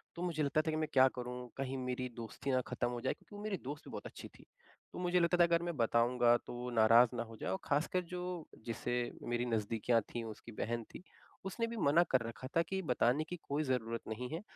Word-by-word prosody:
तो 170 - -6
मुझे 165 -4 0
लगता 145 +2 +2
था 160 0 -1
कि, 155 - -1
"मैं 155 -1 0
क्या 130 -1 +7
करूँ? 125 0 -4 0.2
कहीं 135 0 -2
मेरी 125 0 -2
दोस्ती 115 +4 -4
ना 130 -1 +3
ख़त्म 120 - -1
हो 120 -1 -4
जाए।" 130 - 0
क्योंकि 205 - -16
वो 205 - -7
मेरी 210 -3 -1
दोस्त 145 +1 -5
भी - - -9
बहुत - - -6
अच्छी - - -9
थी। - - -19 0.5
तो - - -6
मुझे 180 0 +2
लगता 175 +1 +3
था, 175 - +7
अगर 170 0 +3
मैं 170 -1 -2
बताऊँगा, 120 +1 +4
तो - - -10
वो 125 +1 -4
नाराज़ 115 +2 +7
ना 115 - -1
हो 115 -1 -11
जाए - - -3
और 95 - 0
ख़ासकर 155 +5 +1
जो 180 0 -3 0.4
जिससे 120 +1 -2 0.4
मेरी 120 0 +1
नज़दीकियाँ 115 0 +1
थीं, 120 - -2
वो 110 - -5
उसकी 115 - -11
बहन 115 +1 -2
थी। - - -8 0.4
उसने 230 +5 -1
भी 230 0 -5
मना 170 -2 +5
कर 125 - +5
रखा 125 +4 -8
था 165 - +6
कि, 190 +3 -2
"बताने 130 -1 +2
की 180 - -6
कोई 145 +2 -1
ज़रूरत 115 -4 -1
नहीं 120 +3 -4
है। 165 - -3
130 Hz, 245 wpm, -35 LUFS, 120-165 Hz, 0.5 s, क्या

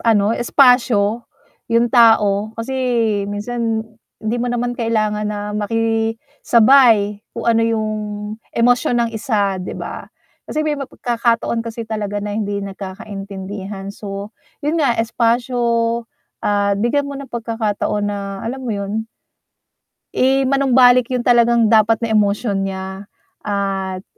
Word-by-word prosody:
ano 215 -2 +3
espasyo 240 -3 +3 0.4
'yung 230 0 +2
tao, 220 -3 +4
kasi 230 +3 -4 0.6
minsan 225 +1 -2 0.3
hindi 220 +2 -2
mo 245 - -1
naman 245 0 -1
kailangan 215 -3 -1
na 210 0 -4
makisabay 225 0 +2 0.2
kung 230 - -4
ano 230 -1 +3
yung 225 -1 0 0.7
emosyon 245 +1 +3
ng 235 -1 +1
isa, 210 -5 -1
'di 180 - -6
ba? - - -7 0.4
Kasi 310 0 -1
may 305 - 0
pagkakataon 235 -3 -1
kasi 230 0 -6
talaga 210 -2 -4
na 205 - -3
hindi 205 -1 -2
nagkakaintindihan. 195 0 -7
So, 200 +1 -7 0.3
'yun 315 +3 +1
nga 255 -6 +2
espasyo. 240 +2 0 0.8
Ah, 205 -1 +1
bigyan 280 +6 +1
mo 280 - -6
ng 275 - -9
pagkakataon 220 -3 -2
na, 200 -1 -5
alam 260 +3 -5
mo 235 - -2
'yun? 205 +2 -3 1.1
I 270 +1 +2
manumbalik 255 -2 +4
'yung 250 -2 -2
talagang 235 -2 +4
dapat 220 0 +5
na 225 - -1
emosyon 205 -1 +1
niya, 190 +1 -7 0.3
at, 195 -2 -3
225 Hz, 125 wpm, -19 LUFS, 205-240 Hz, 1.1 s, dapat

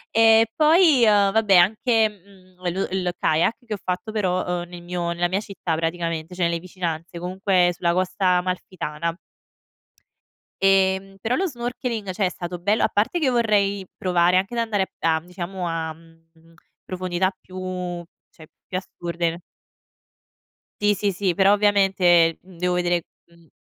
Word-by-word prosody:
E 225 0 +6
poi, 310 -4 +5
ehm, 205 -2 +4
vabbè 210 -3 +3
anche, 220 +5 +4
mhmm, 190 -2 -21 0.2
lo 190 +3 -2
il 185 -1 -1
kayak 160 +8 +2
che 220 - -4
ho - - -3
fatto 185 +4 -3
però, 185 -4 0 0.2
ehm, 175 - -9
nel 175 -1 -10
mio 175 -1 -3
nella 175 +1 0
mia 185 +3 -1
città, 195 -6 -4
praticamente, 165 +1 -3
cioè 180 - -1
nelle 170 0 +1
vicinanze 170 -1 -5
comunque 180 0 +1
sulla 170 0 0
Costa 185 +1 -1
Amalfitana 170 -3 -3 1.5
ehm, 195 0 +2
però 235 +4 0
lo 385 - 0
snorkeling, 240 - -4
cioè 195 +2 -1
è 180 - +1
stato 175 -1 -6
bello 205 +5 +1
a - - +3
parte 220 +12 0
che 285 -5 +2
vorrei 200 -5 +1
provare 180 -1 +2
anche 195 +6 -1
ad - - 0
andare 205 -4 0
p - - -31
a, 160 -1 +3
mhmm, 170 - -20
diciamo 180 0 -5
a, 165 -1 -3
mhmm, 165 0 -23 0.3
profondità 185 0 -1
più 185 -1 -6 0.3
cioè 160 -2 -16 0.2
più 185 - -3
assurde. 170 -2 -4 1.4
Sì, 205 0 +4
sì, 200 +1 0
sì, 185 0 -1
però 195 0 +4
ovviamente, 190 -5 +3
ehm, 185 -1 -17
devo 180 +1 0
vedere 175 -1 +1 0.2
mhmm 170 -1 -23
185 Hz, 160 wpm, -23 LUFS, 175-205 Hz, 1.5 s, E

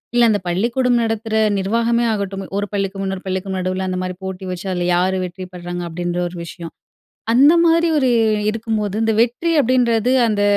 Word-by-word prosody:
இல்ல 240 -1 +5
அந்த 205 -2 +2
பள்ளிக்கூடம் 235 +7 +1
நடத்துற 225 0 -3 0.3
நிர்வாகமே 230 +4 +1
ஆகட்டும். 195 -2 -3 0.2
ஒரு 205 - -2
பள்ளிக்கும், 195 -1 -2
இன்னொரு 190 0 -4
பள்ளிக்கும் 190 0 -3
நடுவுல 185 +1 -2
அந்தமாரி 185 0 -3
போட்டி 190 0 -6
வச்சு, 180 +2 -6
அதுல 175 0 -1
யாரு 185 +1 +1
வெற்றி 180 +1 -7
பெர்றாங்க 175 0 -5
அப்டீன்ற 175 +1 -3
ஒரு 175 - -10
விஷயம். 165 +1 -9 0.6
அந்தமாரி 335 +5 +5
ஒரு 260 -3 +2 0.4
இருக்கும்போது, 215 -2 -2
இந்த 225 0 +2
வெற்றி 245 +8 -1
அப்டீன்றது 245 -1 +2 0.2
அந்த 205 -1 0
200 Hz, 160 wpm, -19 LUFS, 185-235 Hz, 0.6 s, இல்ல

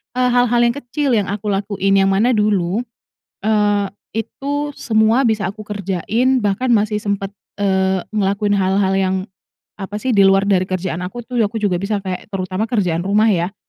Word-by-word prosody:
eee, 255 0 +2
hal-hal 245 -1 +3
yang 235 0 +2
kecil 280 +2 -2
yang 205 - 0
aku 205 +1 -3
lakuin. 195 0 0
Yang 195 0 +3
mana 205 +5 +2
dulu, 205 +1 +1 0.6
eee, 205 -1 +1 0.4
itu 290 +1 -4
semua 220 +1 +2
bisa 220 -4 +1
aku 205 +3 -6
kerjain 210 +6 0
bahkan 210 +5 0
masih 210 0 +1
sempet, 200 -1 -3 0.2
eee, 190 -2 +1
ngelakuin 205 0 0
hal-hal 190 0 +1
yang 190 0 +1 0.6
apa 195 +1 -7
sih, 260 - -1
di 200 -4 +5
luar 195 0 +4
dari 195 -2 +2
kerjaan 185 -2 -3
aku 240 +6 -7
tuh, 245 +1 -5
aku 220 -1 +1
juga 180 -4 +1
bisa 200 +1 -2
kayak, 185 -2 -5
terutama 185 +3 -2
kerjaan 195 -8 0
rumah 215 +2 +3
ya. 180 +1 0
205 Hz, 170 wpm, -18 LUFS, 195-220 Hz, 0.6 s, di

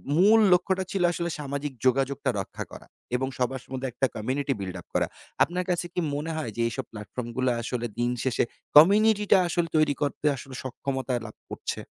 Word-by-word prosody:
মূল 210 +6 +6
লক্ষ্যটা 190 +1 +2
ছিল 190 -2 0
আসলে 170 0 -2
সামাজিক 140 0 -3
যোগাযোগটা 135 +2 +2
রক্ষা 95 - -5
করা - - -11 0.3
এবং 130 +1 0
সবার 130 +1 -1
মধ্যে 130 +1 -2
একটা 135 +3 +1
community 135 +5 -1
build 95 -2 -5
up - - -26
করা। - - +2 0.4
আপনার 180 +1 -1
কাছে 175 0 0
কি 180 - -1 0.2
মনে 155 +3 -3
হয় 150 -8 -3
যে 115 - -1
এইসব 130 +1 -4
platform 115 +3 -6
গুলো 130 0 +2
আসলে 120 0 -3
দিন 120 0 +2
শেষে 130 -3 +2 0.3
community 210 +5 +6
টা - - +9
আসলে 175 0 0
তৈরি 155 -2 +4
করতে 145 0 -2
আসলে 130 0 -9
সক্ষমতা 130 0 -3
লাভ 110 - -9
করছে? - - -4
135 Hz, 185 wpm, -27 LUFS, 125-170 Hz, 0.4 s, টা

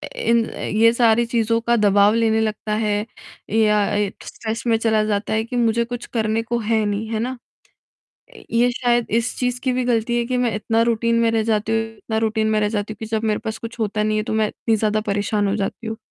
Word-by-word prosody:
इन 235 - +2
ये 225 +2 +2
सारी 235 -1 +3
चीज़ों 230 -1 +1
का 235 +1 +2
दबाव 205 0 +4
लेने 225 -1 +2
लगता 215 -1 -2
है 210 0 0 0.5
या 210 -2 +3 0.4
स्ट्रेस 225 0 -5
में 225 - +3
चला 220 -1 +2
जाता 205 0 -1
है 220 0 +1
कि 240 +2 -7
मुझे 235 -1 +2
कुछ 245 0 -6
करने 225 -1 -1
को 235 0 -2
है 220 -1 +1
नहीं, 205 +2 -2
है 220 - -2
ना? 250 +3 -3 1.1
ये 240 +2 +3
शायद 240 -1 +1
इस 230 +2 0
चीज़ 250 -1 -1
की 260 - 0
भी 250 0 -1
ग़लती 240 0 0
है 235 - 0
कि 255 - -1
मैं 240 -4 0
इतना 225 +2 +1
रूटीन 230 0 +1
में 230 - +3
रह 225 -1 +1
जाती 220 0 0
हूँ 225 - +2 0.2
इतना 220 0 -3
रूटीन 220 0 0
में 215 - +2
रह 210 - +1
जाती 210 0 -3
हूँ - - -11
कि 220 - -6
जब 220 0 -2
मेरे 210 - +1
पास 220 -1 -4
कुछ 230 +1 -8
होता 210 0 0
नहीं 215 0 0
है, 215 - +1
तो 215 - -4
मैं 220 -1 +2
इतनी 225 -1 -1
ज़्यादा 215 0 0
परेशान 205 0 0
हो 195 - 0
जाती 210 +3 -4
हूँ। 220 0 -4
225 Hz, 230 wpm, -21 LUFS, 215-235 Hz, 1.1 s, दबाव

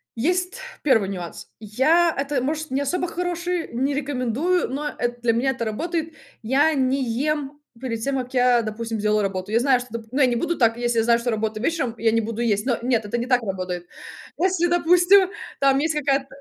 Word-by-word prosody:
есть 360 - 0 0.3
1 225 -9 +3
нюанс. 175 -3 -7
Я, 310 +11 +2
это 275 -2 -1
может 310 +1 -3
не 275 +2 0
особо 360 +5 -1
хороший, 350 0 -3
не 270 +4 0
рекомендую, 285 +5 0
но 290 +3 -3
эт 240 0 -2
для 230 -1 +2
меня 260 +4 +1
это 240 -3 -4
работает. 325 +8 -3 0.3
Я 280 +7 +2
не 265 0 +1
ем 290 +4 -2 0.2
перед 230 -4 -4
тем 275 +2 -1
как 255 +1 -5
я, 250 -1 +4
допустим, 225 +1 -4
делаю 210 0 +2
работу. 195 0 -3
Я 230 - +3
знаю 255 -1 +3
дп 245 -2 -10
ну, 230 -1 -4
что 250 +5 -6
я - - +7
не 245 -1 +1
буду 340 +7 -1
так 230 -2 +3
если 240 -1 0
знаю 235 +1 +3
что 240 +1 -2
работа 215 0 -2
вечером, 260 -6 -1
я 225 0 +2
не 230 - +2
буду 230 +1 -4
есть, 210 -1 +1
но 245 -4 +1
нет 235 -3 0
это 220 +3 -2
не 240 - -2
так 250 -2 +3
работает. 185 -3 -4 0.5
Если 360 -1 +2
допустим 355 +2 +5 0.3
там 275 -1 +4
есть 310 +2 0
какая-то 275 -1 +1
255 Hz, 205 wpm, -23 LUFS, 230-305 Hz, 0.5 s, я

